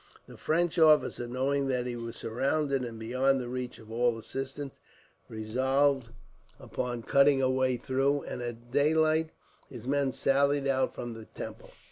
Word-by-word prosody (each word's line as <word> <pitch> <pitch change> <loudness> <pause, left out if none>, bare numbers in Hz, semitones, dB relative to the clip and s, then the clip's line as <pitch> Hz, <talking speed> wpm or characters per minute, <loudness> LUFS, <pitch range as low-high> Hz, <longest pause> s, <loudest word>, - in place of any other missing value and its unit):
The - - -13
French 170 +2 0
officer, 155 -6 +4
knowing 135 +3 0
that 125 -2 0
he 125 -1 -3
was 115 -1 -6
surrounded, 135 +3 0
and 115 -2 -6
beyond 130 +4 +1
the 125 - -4
reach 125 -2 -4
of 110 -2 -14
all 120 0 +1
assistance, 135 +4 -6 0.5
resolved 130 +4 +1 0.5
upon 120 -2 -4
cutting 140 +1 +4
a 130 -1 +2
way 130 -1 +1
through, 135 +3 0
and - - -6
at 120 0 -7
daylight 155 +3 +3 0.4
his 120 -3 -10
men 140 0 +1
sallied 140 +1 +2
out 130 -1 +1
from 120 -1 -5
the 110 -1 -10
temple. - - -9
130 Hz, 155 wpm, -29 LUFS, 120-140 Hz, 0.5 s, officer